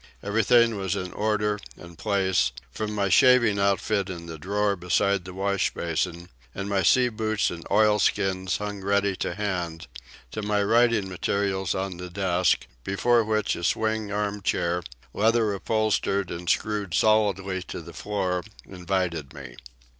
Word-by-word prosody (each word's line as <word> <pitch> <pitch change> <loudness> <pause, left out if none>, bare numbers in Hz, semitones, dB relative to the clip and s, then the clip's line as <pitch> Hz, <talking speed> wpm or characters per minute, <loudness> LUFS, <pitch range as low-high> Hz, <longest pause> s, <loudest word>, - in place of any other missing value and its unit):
Everything 115 +2 +3
was 95 -2 -2
in 90 0 -5
order 105 -1 0 0.2
and 85 0 -12
place, 95 - +1 0.2
from 105 -1 -4
my 100 -2 0
shaving 120 +1 +5
outfit 100 0 +1
in 85 -2 -6
the 80 -2 -8
drawer 100 +4 0
beside 90 +1 +1
the 90 - -8
wash 100 0 0
basin, 85 +1 -2 0.3
and 100 0 -4
my 100 -1 +1
sea 125 +7 +4
boots 110 -2 -1
and 85 -1 -8
oilskins 100 -3 +2
hung 105 -1 -5
ready 100 0 +1
to 85 - -3
hand, 90 -5 -3 0.5
to 110 - -4
my 105 0 +1
writing 115 -1 +3
materials 95 0 -1
on 95 -1 -3
the 90 0 -7
desk, 90 -2 +1 0.2
before 115 - +2
which 110 -1 0
a 85 - -7
swing 110 +1 0
arm 105 0 -2
chair, 90 -2 0 0.3
leather 110 0 +2
upholstered 100 -2 0
and 85 0 -5
screwed 105 -5 0
solidly 100 -3 +2
to - - -7
the - - -11
floor, 95 -4 -2 0.2
invited 90 -5 -3
me. 65 -4 -9
100 Hz, 150 wpm, -25 LUFS, 90-105 Hz, 0.5 s, shaving